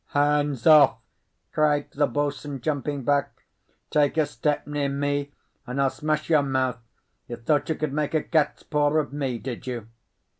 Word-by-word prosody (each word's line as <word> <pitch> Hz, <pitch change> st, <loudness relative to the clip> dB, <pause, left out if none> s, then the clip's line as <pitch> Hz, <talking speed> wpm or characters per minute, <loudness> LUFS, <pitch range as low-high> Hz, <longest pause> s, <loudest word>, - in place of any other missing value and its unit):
"Hands 145 Hz, -3 st, +1 dB
off!" 150 Hz, -7 st, +7 dB, 0.6 s
cried 150 Hz, -1 st, +1 dB
the 145 Hz, 0 st, +1 dB
boatswain, 145 Hz, -1 st, -3 dB
jumping 145 Hz, 0 st, -2 dB
back. 145 Hz, +1 st, 0 dB, 0.5 s
"Take 150 Hz, 0 st, +2 dB
a 155 Hz, -, +4 dB
step 145 Hz, 0 st, -2 dB
near 145 Hz, -1 st, -1 dB
me, 145 Hz, 0 st, -1 dB, 0.4 s
and 125 Hz, +3 st, -3 dB
I'll 135 Hz, -1 st, +3 dB
smash 155 Hz, 0 st, -2 dB
your 155 Hz, -3 st, +4 dB
mouth. 130 Hz, -3 st, -1 dB, 0.5 s
You 120 Hz, -, -5 dB
thought 145 Hz, +6 st, 0 dB
you 160 Hz, -, +1 dB
could 150 Hz, -3 st, -3 dB
make 150 Hz, +1 st, -1 dB
a 155 Hz, -, +2 dB
cat's 155 Hz, -3 st, 0 dB
paw 150 Hz, 0 st, +1 dB
of 145 Hz, -2 st, -1 dB
me, 135 Hz, -4 st, -2 dB
did 125 Hz, +1 st, -7 dB
you?" 120 Hz, -3 st, -5 dB
145 Hz, 165 wpm, -25 LUFS, 135-150 Hz, 0.6 s, off